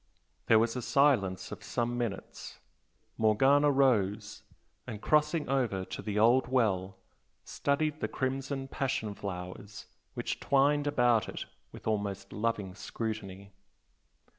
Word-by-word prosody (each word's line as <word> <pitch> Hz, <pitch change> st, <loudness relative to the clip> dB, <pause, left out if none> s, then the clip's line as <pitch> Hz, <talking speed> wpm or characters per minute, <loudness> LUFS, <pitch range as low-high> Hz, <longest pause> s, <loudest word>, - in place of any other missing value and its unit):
There 115 Hz, -, +6 dB
was 115 Hz, +2 st, +2 dB
a 125 Hz, -, -2 dB
silence 105 Hz, -10 st, +2 dB
of -, -, -8 dB
some 120 Hz, 0 st, -2 dB
minutes. 115 Hz, -5 st, -5 dB, 0.6 s
Morgana 135 Hz, +7 st, +4 dB
rose, 105 Hz, -7 st, +1 dB, 0.5 s
and 105 Hz, -, -6 dB
crossing 150 Hz, +4 st, +2 dB
over 120 Hz, -8 st, 0 dB
to -, -, -6 dB
the 105 Hz, -1 st, -3 dB
old 120 Hz, +4 st, +4 dB
well, 100 Hz, -7 st, 0 dB, 0.5 s
studied 150 Hz, +2 st, -1 dB
the -, -, -1 dB
crimson 135 Hz, +1 st, -3 dB
passion 130 Hz, -6 st, -2 dB
flowers 100 Hz, +1 st, -7 dB, 0.3 s
which -, -, -3 dB
twined 145 Hz, +1 st, +2 dB
about 120 Hz, -6 st, +2 dB
it, -, -, -6 dB, 0.3 s
with -, -, -12 dB
almost 100 Hz, -2 st, -2 dB
loving 105 Hz, -3 st, -2 dB
scrutiny. 100 Hz, -2 st, -6 dB
115 Hz, 120 wpm, -30 LUFS, 100-135 Hz, 0.6 s, There